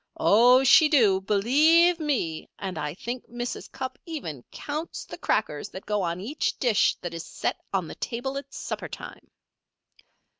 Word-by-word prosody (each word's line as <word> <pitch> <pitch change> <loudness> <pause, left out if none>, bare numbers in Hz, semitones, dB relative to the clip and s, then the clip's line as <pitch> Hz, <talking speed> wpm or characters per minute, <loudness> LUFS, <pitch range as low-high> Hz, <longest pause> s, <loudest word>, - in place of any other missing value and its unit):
Oh, 245 +5 +6
she 305 +4 +7
do 215 -11 +4
believe 305 - +4
me! 250 - -2
And 190 -2 -5
I 150 +1 -3
think 240 +5 -6
Mrs. 240 +1 -5
Cupp 260 0 -6
even 165 - -6
counts 305 +3 -5
the - - -8
crackers 150 -9 -1
that 190 - -10
go 210 -1 0
on 170 -1 -2
each 250 +11 -2
dish 235 -5 +3
that 175 -1 -5
is 165 -1 -5
set - - -3
on 185 -4 -1
the - - -7
table 255 +3 -4
at 275 0 -14
supper - - -5
time. - - -10
235 Hz, 160 wpm, -26 LUFS, 190-275 Hz, -, she